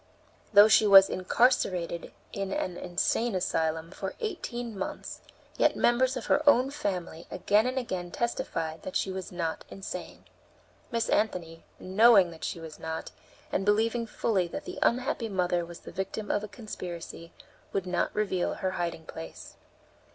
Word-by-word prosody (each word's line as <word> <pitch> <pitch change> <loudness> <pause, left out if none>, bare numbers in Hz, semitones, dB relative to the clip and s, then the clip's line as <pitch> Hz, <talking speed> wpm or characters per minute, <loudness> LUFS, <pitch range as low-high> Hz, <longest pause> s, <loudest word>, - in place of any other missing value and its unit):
Though 205 0 +9
she 215 0 +5
was 195 -1 +9
incarcerated 185 -5 +1 0.2
in 195 -1 -3
an 185 -2 -2
insane 190 +6 0
asylum 165 -2 -1
for 190 0 -5
eighteen 245 - -4
months, 190 - -5 0.4
yet - - +4
members 255 +2 +3
of 245 - -5
her 290 - +3
own 265 0 +4
family 180 - -4
again 210 +4 +2
and 255 +1 -2
again 185 -8 -3
testified 165 -9 -3
that 185 - -7
she 190 - 0
was 190 -1 -6
not 170 -2 -3
insane. 195 - -7 0.6
Miss 230 -2 -1
Anthony, 170 -6 -1
knowing 195 -1 +5
that 160 - -12
she - - -3
was 160 -2 -9
not, 160 0 -5 0.4
and - - 0
believing 225 +3 +2
fully 200 -5 0
that 290 - -6
the 365 - -6
unhappy 245 -2 +1
mother 180 -3 +1
was 170 0 -10
the - - -10
victim 200 +2 -3
of 205 - 0
a - - -4
conspiracy, 180 -5 -8 0.4
would 195 -2 -1
not 180 -1 0
reveal 195 -4 0
her 190 -2 -2
hiding 170 -3 -3
place. 80 - -9
195 Hz, 155 wpm, -29 LUFS, 175-230 Hz, 0.6 s, Though